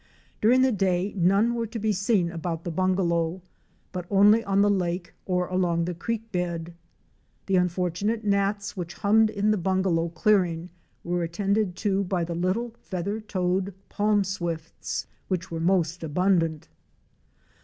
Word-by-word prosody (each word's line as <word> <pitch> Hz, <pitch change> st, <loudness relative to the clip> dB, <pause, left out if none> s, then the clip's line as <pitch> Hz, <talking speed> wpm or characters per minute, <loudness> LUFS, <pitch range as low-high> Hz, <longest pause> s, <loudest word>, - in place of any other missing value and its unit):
During 250 Hz, +4 st, +5 dB
the 260 Hz, -, +4 dB
day 190 Hz, -2 st, 0 dB
none 200 Hz, +6 st, +3 dB
were 230 Hz, -1 st, -2 dB
to 230 Hz, -, -6 dB
be 220 Hz, 0 st, 0 dB
seen 195 Hz, -3 st, +1 dB
about 165 Hz, -1 st, -4 dB
the 175 Hz, -, -3 dB
bungalow, 175 Hz, -1 st, 0 dB, 0.5 s
but 180 Hz, -2 st, -5 dB
only 210 Hz, +3 st, +5 dB
on 200 Hz, 0 st, +3 dB
the 205 Hz, -, +4 dB
lake 175 Hz, -2 st, -1 dB
or 180 Hz, -1 st, 0 dB
a'ong 175 Hz, -2 st, +1 dB
the 180 Hz, -, -2 dB
creek 225 Hz, +5 st, -4 dB
bed. 175 Hz, -2 st, -3 dB, 0.7 s
The 195 Hz, -1 st, +2 dB
unfortunate 180 Hz, +5 st, 0 dB
gnats 200 Hz, 0 st, 0 dB
which 175 Hz, -3 st, -5 dB
hummed 220 Hz, +1 st, +4 dB
in 210 Hz, 0 st, +1 dB
the 215 Hz, -, +1 dB
bungalow 180 Hz, -2 st, +1 dB
clearing 175 Hz, -1 st, +1 dB, 0.3 s
were 175 Hz, 0 st, -1 dB
attended 195 Hz, +3 st, 0 dB
to 200 Hz, -1 st, +2 dB
by 180 Hz, -2 st, -1 dB
the 170 Hz, +1 st, -3 dB
little 185 Hz, +8 st, -1 dB
Feather 195 Hz, +3 st, -3 dB
toed 185 Hz, -2 st, -1 dB
Palm 205 Hz, 0 st, +2 dB
Swifts," 170 Hz, -4 st, -4 dB, 0.2 s
which 185 Hz, -2 st, -3 dB
were 165 Hz, -, -3 dB
most 170 Hz, -1 st, +1 dB
abundant. 165 Hz, -1 st, +1 dB
185 Hz, 150 wpm, -26 LUFS, 175-205 Hz, 0.7 s, During